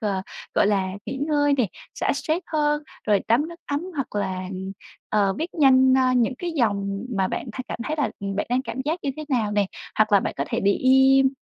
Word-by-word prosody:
ờ, 200 -4 -1 0.3
gọi - - +4
là, 195 -2 +1 0.2
nghỉ - - -4
ngơi 290 -2 +2
nè, 245 - +3 0.3
xả - - 0
stress 320 +3 -1
hơn, 295 -1 +1 0.2
rồi 210 -2 +3
tắm 250 +8 +3
nước 340 +1 -11
ấm 285 0 -1
hoặc 275 -7 -4
là, 185 -2 -2
ừm, 190 +1 -5 0.4
ờ, 200 -2 +2
viết 330 +3 -4
nhanh, 260 -4 +5
a, 255 -1 +3
những 245 +1 +2
cái 350 - -3
dòng 200 -5 -1
mà 190 -1 +1
bạn - - -4
thay 255 +3 -5
cảm - - -4
thấy 305 +4 -2
là, 295 - 0
ừm, 195 0 -3
bạn - - -1
đang 255 +2 +2
cảm 260 - -5
giác 315 +4 -1
như 280 - -1
thế 310 - -5
nào 235 -7 +1
nè. 205 -1 +2 0.3
Hoặc 215 -1 +3
là 200 - +6
bạn - - -3
có 140 - -1
thể - - -1
để 200 +1 +3
im, 265 +2 +5
255 Hz, 235 wpm, -24 LUFS, 200-290 Hz, 0.4 s, là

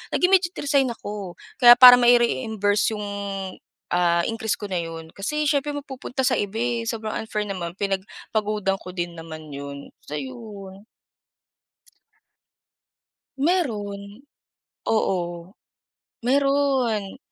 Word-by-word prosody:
Nag-immediate 360 -1 +3
resign 280 -2 +2
ako. 205 -5 -6 0.2
Kaya 240 -1 +10
para 245 0 +10
mai-reimburse 225 -3 +2
yung, 210 -1 -5 0.9
ah, 170 -1 +3
increase 220 -4 -2
ko 205 - -7
na 185 -3 -2
'yon, 165 -1 -8
kasi 300 +10 -2
siyempre 290 -1 +1
mapupunta 265 -2 -4
sa - - +3
iba 205 +1 -3
eh, 235 0 0
sobrang 220 -2 -4
unfair 210 -1 -3
naman. 185 -3 -5
Pinagpagudan 200 0 -2
ko - - -9
din 175 -1 -4
naman 155 -2 -9
'yon, 140 0 -8
so 150 - -6
'yon. 190 - -9 2.5
Meron. 215 - -2 0.6
Oo, 175 -4 -1 0.7
meron. 265 -5 +1
210 Hz, 105 wpm, -23 LUFS, 185-245 Hz, 2.5 s, Kaya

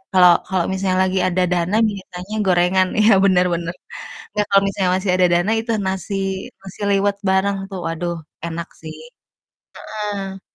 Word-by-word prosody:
kalau 180 -1 +8 0.2
kalau 185 -3 0
misalnya 190 -1 0
lagi 190 0 0
ada 185 0 0
dana, 180 +3 0
biasanya 190 0 -8
gorengan 185 +1 +3
iya, 215 +1 +5
bener 180 -2 +4
bener, 170 0 -3 0.6
nggak, 210 -1 0
kalau 195 0 +5
misalnya 190 -2 0
masih 190 -1 -1
ada 180 -1 +4
dana 175 +5 +2
itu 230 +1 -3 0.2
nasi 190 +1 -3 0.5
nasi 195 0 -12
liwet 200 0 +1
bareng, 195 +1 +2
tuh. 190 - -5
Waduh, 170 +1 -3 0.3
enak 170 +1 -5
sih. 155 -1 -8 0.9
Heeh. 200 -3 -5
190 Hz, 155 wpm, -20 LUFS, 180-195 Hz, 0.9 s, kalau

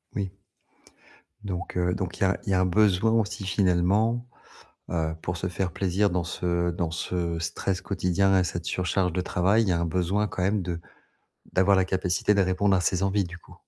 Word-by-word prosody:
Oui. 100 -2 -2 1.1
Donc 90 -3 -4
heu 90 0 +1
donc 90 -2 -4
il - - -16
y - - +4
a 95 0 +2
il - - -4
y - - +2
a 95 - +3
un 95 - +3
besoin 100 +3 +3
aussi 105 -3 0
finalement, 100 +5 +2 0.6
heu, 80 -2 -1
pour 85 - -3
se - - -2
faire 90 +1 -2
plaisir 95 +3 +1
dans 90 -1 -1
ce 85 0 -1
dans 85 -1 -2
ce 85 0 -2
stress 90 +3 -2
quotidien 95 0 +2
et - - +3
cette 85 -1 -4
surcharge 90 +1 0
de 90 - -1
travail, 95 +5 +2
il - - -2
y - - +3
a 85 - 0
un 85 - 0
besoin 90 +5 0
quand 95 - -5
même 100 +2 +1
de 85 -2 -4 0.7
d'avoir 95 +2 +4
la 95 - +3
capacité 95 +1 +1
de 100 - +3
répondre 95 +1 +2
à 95 - +3
ses 90 +1 0
envies 100 +1 +1
du 85 0 -8
coup? - - -17
95 Hz, 210 wpm, -26 LUFS, 85-100 Hz, 1.1 s, y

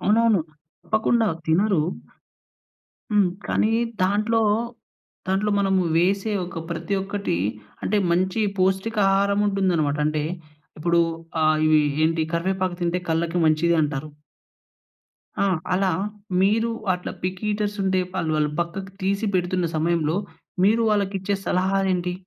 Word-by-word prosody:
అవునవును. 220 -2 +3 0.4
తప్పకుండా 220 +1 +1 0.2
తినరు. 185 +1 +3 1.3
హ్మ్, 205 -3 +4 0.2
కానీ 215 - +1 0.3
దాంట్లో, 215 +4 +2 0.9
దాంట్లో 195 +2 +1
మనము 195 -1 +2
వేసే 195 +5 +1
ఒక 170 -2 -6
ప్రతి 170 +4 -2
ఒక్కటీ 200 - -2 0.4
అంటే 210 - 0 0.2
మంచి 185 +5 +1 0.2
పోష్టిక 190 +4 +1 0.2
ఆహారముంటుందనమాట. 195 -6 +1
అంటే 155 -1 -1 0.5
ఇప్పుడు 170 +2 +2 0.4
ఆహ్, 155 0 +3
ఇవి 155 -1 +5 0.2
ఏంటి? 165 0 +1
"కరివేపాకు 185 +1 -1
తింటే 175 +1 0
కళ్ళకి 165 +2 0
మంచిది 165 +2 +3
అంటారు." 150 0 -3 1.3
ఆ! - - +3 0.3
అలా, 190 0 +2 0.5
మీరు 225 +4 +2 0.2
అట్లా 180 - -6
పికీటర్సుంటే 200 0 -1
వాళ్ళు 165 -4 -1
వాళ్ళు 150 -1 +1
పక్కకి 190 +3 -4
తీసి 200 +3 0
పెడుతున్న 180 0 0
సమయంలో, 160 0 +1 0.5
మీరు 225 +3 +4
వాళ్ళకిచ్చే 200 -1 0
సలహాలేంటి? 185 -1 +1
190 Hz, 110 wpm, -23 LUFS, 170-200 Hz, 1.3 s, ఇవి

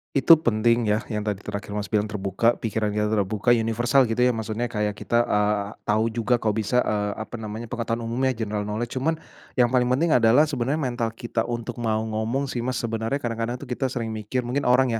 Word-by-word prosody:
Itu 140 +4 +7
penting 120 -4 +2
ya, 105 0 +2
yang 105 -2 -3
tadi 105 -2 -2
terakhir 105 0 -6
Mas 105 -1 -3
bilang 105 -1 +1
terbuka, 105 +2 +1
pikirannya 105 -1 -1
terbuka 105 +1 -1
universal 120 +3 +3
gitu 115 0 -1
ya 125 - +5
maksudnya 115 0 -2
kayak 105 -1 -1
kita 120 +4 +1
eee, 105 -1 +1 0.2
tahu 110 +2 +2
juga 115 +1 +1
kok 110 -2 0
bisa 110 +4 +1
eee 105 -1 -1
apa 110 +1 -6
namanya, 110 +1 -5
pengetahuan 115 0 -3
umumnya, 125 +2 0
general 105 -2 -2
knowledge. 105 +3 -3
Cuman 160 +4 +1 0.4
yang 125 -1 +3
paling 125 -1 +3
penting 150 +6 +2
adalah 120 +4 +5
sebenarnya 140 -1 -1
mental 120 -2 -1
kita 115 -1 -2
untuk 120 0 -4
mau 110 -1 0
ngomong 110 +5 -1
sih 125 -3 -3
Mas, 125 +1 -2
sebenarnya 115 +2 -2
kadang-kadang 115 +1 -2
tuh - - -9
kita 130 +2 -2
sering 115 -3 -3
mikir 110 +4 -3
mungkin 125 +2 -1
orang 125 0 +4
115 Hz, 200 wpm, -24 LUFS, 105-125 Hz, 0.4 s, Itu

